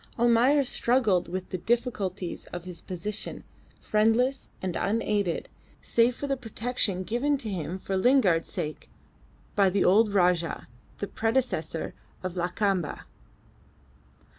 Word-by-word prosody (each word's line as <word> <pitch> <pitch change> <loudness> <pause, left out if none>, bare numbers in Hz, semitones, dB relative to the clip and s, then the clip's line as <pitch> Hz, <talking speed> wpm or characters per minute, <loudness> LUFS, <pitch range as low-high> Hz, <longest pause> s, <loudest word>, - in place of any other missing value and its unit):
Almayer 240 +5 +4
struggled 235 -7 +2
with 185 +1 -5
the 185 - -3
difficulties 200 -5 -2
of 175 -1 -7
his 180 -2 -9
position, 195 +3 -4 0.4
friendless 225 +5 +2
and 185 -2 -3
unaided, 205 -4 0 0.3
save 235 +1 +2
for 285 - -4
the 275 -1 0
protection 225 -5 -2
given 260 +8 +1
to 235 - -4
him 175 -1 -3
for 190 0 -3
Lingard's 190 -6 +3
sake 150 0 -4 0.7
by 200 -2 +5
the 195 +1 +1
old 210 +3 +5
Rajah, 180 -3 +1 0.3
the 205 - -3
predecessor 225 - -1 0.3
of 185 -1 -3
Lakamba. 180 -1 -1
205 Hz, 120 wpm, -27 LUFS, 180-240 Hz, 0.7 s, by